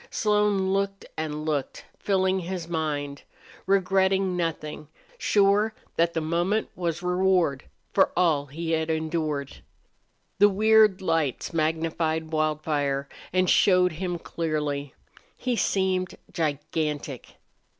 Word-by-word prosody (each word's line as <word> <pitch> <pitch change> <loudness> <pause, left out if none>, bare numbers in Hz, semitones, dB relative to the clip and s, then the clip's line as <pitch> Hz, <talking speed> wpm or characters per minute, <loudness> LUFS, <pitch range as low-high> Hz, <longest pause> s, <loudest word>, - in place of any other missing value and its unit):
Slone 210 -3 +1
looked 195 0 -1
and 155 -1 -4
looked, 150 -3 -3
filling 190 -1 +1
his 180 -1 -5
mind, 145 -4 -3 0.5
regretting 190 -1 +2
nothing, 155 -3 -3 0.3
sure 205 - +3 0.2
that 170 0 +2
the 160 - 0
moment 175 +7 0
was 175 -1 -3
reward 180 -5 +1 0.3
for - - +4
all 155 -5 +2
he 165 +4 -4
had 160 0 0
endured. 155 -3 -2 0.8
The 205 +1 +7
weird 210 -1 +4
lights 165 -4 -1
magnified 160 0 -1
Wildfire 150 -3 0 0.2
and 185 0 +2
showed 180 -1 +4
him 175 +2 -3
clearly. 150 -4 -3 0.4
He 250 -1 -1
seemed 190 -3 0 0.2
gigantic. 150 -3 -3
165 Hz, 110 wpm, -26 LUFS, 155-190 Hz, 0.8 s, The